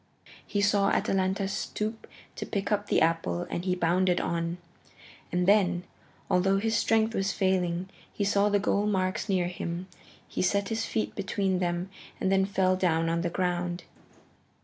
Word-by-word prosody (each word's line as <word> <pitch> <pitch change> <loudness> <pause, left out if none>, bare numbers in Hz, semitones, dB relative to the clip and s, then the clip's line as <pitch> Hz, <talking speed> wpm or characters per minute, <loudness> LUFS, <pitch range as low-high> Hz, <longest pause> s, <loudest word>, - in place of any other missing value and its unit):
He 205 - 0
saw 200 -1 +3
Atalanta 195 0 +1
stoop 215 +2 -4 0.3
to - - -5
pick 200 -1 -2
up 205 0 0
the - - +2
apple, 165 +1 +1
and 175 - -3
he 180 -1 +1
bounded 180 +1 +2
on. 170 0 -2 0.7
And 180 0 +1
then, 185 -4 +4 0.4
although 195 +2 +3
his 220 +3 0
strength 225 0 +2
was 195 -2 0
failing, 185 -2 0 0.2
he 205 - -2
saw 200 +1 +3
the 205 - +3
goal 205 +1 +1
marks 190 0 0
near 185 -3 +2
him. 175 0 -5 0.4
He - - -3
set 200 +2 +1
his 225 0 -1
feet 220 - -2
between 195 -2 -1
them 175 +1 -2 0.3
and 190 - +1
then 190 0 +4
fell 190 -1 +2
down 165 -3 +1
on 170 0 0
the 175 - -1
ground. 175 0 -1
190 Hz, 165 wpm, -28 LUFS, 175-200 Hz, 0.7 s, then